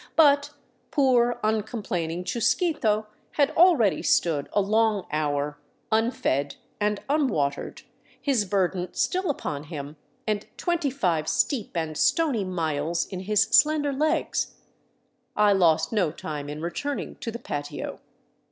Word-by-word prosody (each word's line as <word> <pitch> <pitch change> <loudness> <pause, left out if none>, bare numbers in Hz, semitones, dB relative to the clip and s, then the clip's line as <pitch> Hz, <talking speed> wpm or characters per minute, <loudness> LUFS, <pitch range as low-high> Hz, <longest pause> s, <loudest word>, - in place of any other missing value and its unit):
But 285 -2 +5 0.4
poor, 245 -4 +3
uncomplaining 205 -6 -2
Chusquito 230 - +1 0.3
had 290 0 +2
already 315 - +4
stood 155 -5 +1
a 205 - +2
long 215 0 +2
hour 145 -1 -1 0.3
unfed 220 - 0 0.2
and 210 -1 0
unwatered, 215 - -1 0.4
his 260 -8 +1
burden 185 -2 -1
still 370 -1 0
upon 150 - -3
him 150 -1 -7 0.3
and 210 -2 -2
twenty 345 -5 0
five 175 - 0
steep 230 - 0
and 160 -2 -2
stony 280 - +2
miles 165 -3 -1
in 185 - -5
his 205 +2 +2
slender 290 +5 +3
legs. 305 +3 0 0.8
I 210 -1 +5
lost 160 -4 +3
no 195 -7 +2
time 150 -2 -6
in 150 +2 -6
returning 280 +12 -4
to - - -5
the 230 - -5
patio. 145 -11 -5
210 Hz, 125 wpm, -26 LUFS, 160-265 Hz, 0.8 s, But